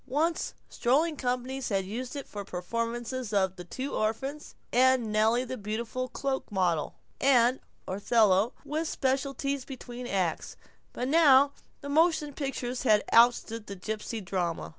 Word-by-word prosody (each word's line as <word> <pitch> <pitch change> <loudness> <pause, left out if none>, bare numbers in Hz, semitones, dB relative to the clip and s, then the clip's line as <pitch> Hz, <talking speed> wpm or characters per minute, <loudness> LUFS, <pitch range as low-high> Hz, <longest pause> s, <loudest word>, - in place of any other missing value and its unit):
Once, 320 +5 0
strolling 300 +6 +1
companies 255 0 -2
had 195 -3 0
used 245 +7 -5
it 280 - -6
for 205 -1 -6
performances 230 +6 -3
of 190 -2 +1
"The 180 - -8
Two 260 +10 -5
Orphans," 265 +8 -2 0.2
and 255 -3 +4
"Nellie 220 +3 +3
the 255 +1 -5
Beautiful 230 +5 -3
Cloak 270 -3 -3
Model," 180 -5 0 0.2
and 255 -2 +4 0.3
"Othello" 205 +2 +3
with 315 +2 -2
specialties 275 0 -1
between 250 -2 -8
acts, 185 -7 -2 0.3
but 250 - -3
now 285 -2 +6 0.3
the 285 - -7
motion 315 -1 +2
pictures 260 -3 -3
had 215 -5 +4
ousted 230 -1 +4
the 200 - -6
gipsy 215 +3 -4
drama. 180 -3 -2
245 Hz, 140 wpm, -29 LUFS, 215-270 Hz, 0.3 s, now